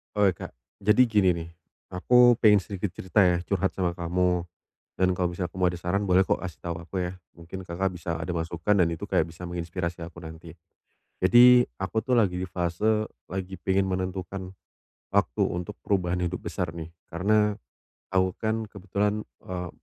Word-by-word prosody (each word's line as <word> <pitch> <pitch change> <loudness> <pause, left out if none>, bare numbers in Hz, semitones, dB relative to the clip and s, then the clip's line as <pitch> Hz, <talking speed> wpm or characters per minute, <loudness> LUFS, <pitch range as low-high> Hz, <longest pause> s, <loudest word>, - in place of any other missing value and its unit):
Oke, 105 -1 +4 0.2
Kak. - - -10 0.2
Jadi 105 +5 +4
gini 105 -4 +4
nih, 85 -1 -6 0.4
aku 120 +6 +5
pengen 105 -4 +5
sedikit 95 -1 -4
cerita 95 +2 +2
ya 90 -1 +2
curhat 95 +1 -1
sama 90 -2 -1
kamu 90 0 0 0.5
dan 95 0 +2
kalau 90 -1 0
misalnya 90 0 -3
kamu 90 - -13
mau - - +4
ada 85 - -6
saran 100 +4 0
boleh 90 0 +4
kok 95 - +1
kasih 85 -5 -8
tahu 85 -1 -4
aku 90 - -11
ya, 90 0 -3 0.2
mungkin 85 +3 -9
Kakak 90 +3 -1
bisa 85 -1 -3
ada 80 - -5
masukan 85 +3 0
dan 90 - +5
itu 80 - -7
kayak - - +2
bisa 80 +1 -13
menginspirasi 85 0 -4
aku 85 0 -11
nanti. 80 0 -10 0.7
Jadi, 120 +5 +7
aku 95 +3 -3
tuh 130 - +2
lagi 100 -7 +2
di 90 - -3
fase 95 +5 0 0.2
lagi 95 +1 -5
pengen 95 0 +1
menentukan 95 0 -4 0.6
waktu - - +2
untuk 90 0 -5
perubahan 90 -3 0
hidup 90 +2 -4
besar 90 -4 -3
nih. 80 -1 -7 0.2
Karena 105 +4 +2 0.6
aku 95 -1 +2
kan 110 0 -1
kebetulan, 100 +1 -2 0.2
eee, 90 -1 -4
90 Hz, 175 wpm, -26 LUFS, 85-100 Hz, 0.7 s, Jadi